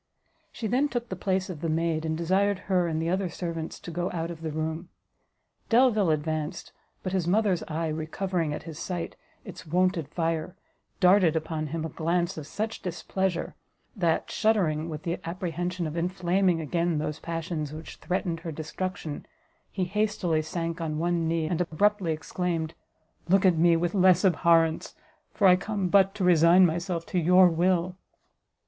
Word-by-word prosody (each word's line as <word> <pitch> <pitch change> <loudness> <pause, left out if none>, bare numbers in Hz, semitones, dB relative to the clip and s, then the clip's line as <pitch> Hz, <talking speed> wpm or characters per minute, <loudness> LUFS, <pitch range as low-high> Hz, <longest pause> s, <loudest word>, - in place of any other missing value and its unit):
She 230 - -6
then 255 +7 +1
took 240 -2 -3
the 185 - -3
place 190 0 -1
of 170 -6 -7
the 165 - -1
maid, 160 0 0
and 160 0 -1
desired 190 +4 +1
her 180 -3 +2
and 160 -1 -1
the 165 - -1
other 190 0 0
servants 165 -2 -5
to 175 - -7
go 175 +2 -2
out 165 -1 -3
of 165 -1 -9
the 160 - -3
room. 160 +2 -3 0.8
Delvile 230 -6 +4
advanced, 155 +2 -2 0.3
but 185 - -3
his 180 -3 0
mother's 195 -2 +2
eye, 160 +1 -2
recovering, 160 +1 -2
at 150 - -5
his 160 -2 -8
sight, 175 -2 -4 0.3
its - - -10
wonted 180 -1 +1
fire, 165 +2 -2 0.4
darted 180 -3 +5
upon 155 -1 -2
him 160 +1 -3
a - - -3
glance 170 +4 -1
of 150 -2 -7
such 220 +5 -4
displeasure, 185 0 -2 0.4
that, 170 -5 0
shuddering 170 -8 +1
with 155 -1 -6
the 170 +1 -2
apprehension 175 +1 -3
of 155 0 -4
inflaming 180 +1 +1
again 170 +1 0
those 150 0 -3
passions 165 -3 -4
which 155 +1 -9
threatened 175 -2 -2
her 165 -1 -6
destruction, 160 0 -5 0.4
he 190 - -2
hastily 190 -4 0
sank 165 +1 -4
on 155 -2 -2
one 170 0 0
knee, 165 -1 0
and 170 +2 -1
abruptly 185 +2 +1
exclaimed, 160 0 -2 0.6
"Look 195 +1 +4
at 180 -2 +5
me 170 0 +5
with 175 +1 -1
less 185 -2 +4
abhorrence, 165 -2 +3 0.4
for 210 -2 0
I 180 -1 +8
come 195 -1 -2
but 195 +1 +4
to 205 - -2
resign 175 +1 +6
myself 170 0 -2
to 185 - -1
your 180 +2 +6
will." 180 +1 +1
170 Hz, 170 wpm, -27 LUFS, 160-185 Hz, 0.8 s, I